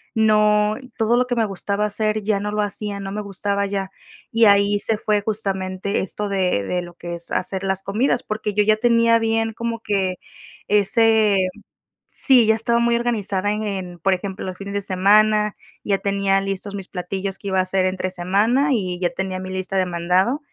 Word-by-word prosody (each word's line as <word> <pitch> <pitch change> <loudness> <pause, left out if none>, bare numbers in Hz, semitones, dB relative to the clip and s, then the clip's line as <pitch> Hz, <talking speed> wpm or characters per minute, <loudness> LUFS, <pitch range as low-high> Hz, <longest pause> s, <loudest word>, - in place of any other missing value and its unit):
No, 210 -1 +3 0.2
todo 230 +1 +2
lo 250 - +2
que 245 - -1
me 230 - +2
gustaba 200 +1 -2
hacer 215 +1 -1
ya 205 -1 +1
no 210 +1 -3
lo 210 0 0
hacía, 205 0 -4
no 195 0 -5
me 210 +1 -3
gustaba 200 0 -1
ya, 195 -1 -3 0.4
Y 230 0 +4
ahí 200 0 +4
se 220 0 -1
fue 210 -1 +1
justamente 195 -2 -2
esto 205 +2 -3
de 185 - +1
de 180 - -2
lo 175 0 -11
que 175 0 -7
es 170 - -5
hacer 190 +1 -2
las 190 0 0
comidas, 240 +5 0
porque 215 -1 -3
yo 210 0 +3
ya 215 +1 +4
tenía 230 0 +4
bien 225 0 0
como 230 0 -4
que 195 -4 -1 0.5
ese 210 -1 +3 0.6
sí, 255 -5 +3
ya 220 - +4
estaba 235 +1 +1
muy 235 0 +2
organizada 205 -4 -1
en 215 +1 -2
en 185 -4 -5
por 195 +3 +2
ejemplo, 190 +1 -4
los 185 -1 -6
fines 200 0 -7
de 200 - -1
semana, 210 +2 +3 0.3
ya 200 -1 +1
tenía 195 -1 +1
listos 195 +1 -4
mis 195 -2 -7
platillos 190 +1 -4
que 200 - -5
iba 190 0 +1
a - - +3
hacer 185 0 0
entre 185 0 -1
semana 210 - +1
y 180 -5 -2
ya 175 - +2
tenía 190 -1 -4
mi 185 0 -6
lista 190 +1 -4
de 185 - +2
mandado 180 - +1
200 Hz, 200 wpm, -21 LUFS, 190-215 Hz, 0.6 s, Y